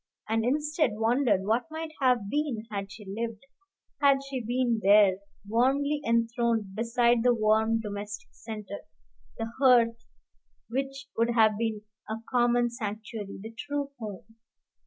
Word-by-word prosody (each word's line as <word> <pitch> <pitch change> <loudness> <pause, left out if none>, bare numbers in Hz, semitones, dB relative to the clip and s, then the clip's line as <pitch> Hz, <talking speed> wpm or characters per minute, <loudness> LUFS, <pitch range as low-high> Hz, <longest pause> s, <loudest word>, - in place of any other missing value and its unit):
and 225 0 +1
instead 295 +3 +1
wondered 225 -2 +2
what 225 +6 +1
might 320 0 -5
have 250 -6 +3
been 265 -3 -2
had 200 -1 -4
she 210 0 -11
lived, 220 +3 -5 0.6
had 280 -1 +6
she 265 -3 -4
been 240 0 0
there, 200 -1 +6 0.3
warmly 275 +6 +2
enthroned 230 -3 0
beside 235 +2 +2
the 245 +1 +4
warm 220 +1 +2
domestic 205 -1 -6
centre, 210 -3 -8 0.6
the 225 0 -4
hearth 235 -3 +4 0.6
which 270 +3 -3
would 230 +1 +2
have 220 -3 +4
been 220 -1 -2 0.3
a 220 - -1 0.2
common 240 -1 +3
sanctuary, 215 -2 -6
the 220 - -7
true 285 +2 -3
home. 220 +1 -8
230 Hz, 135 wpm, -28 LUFS, 215-255 Hz, 0.6 s, had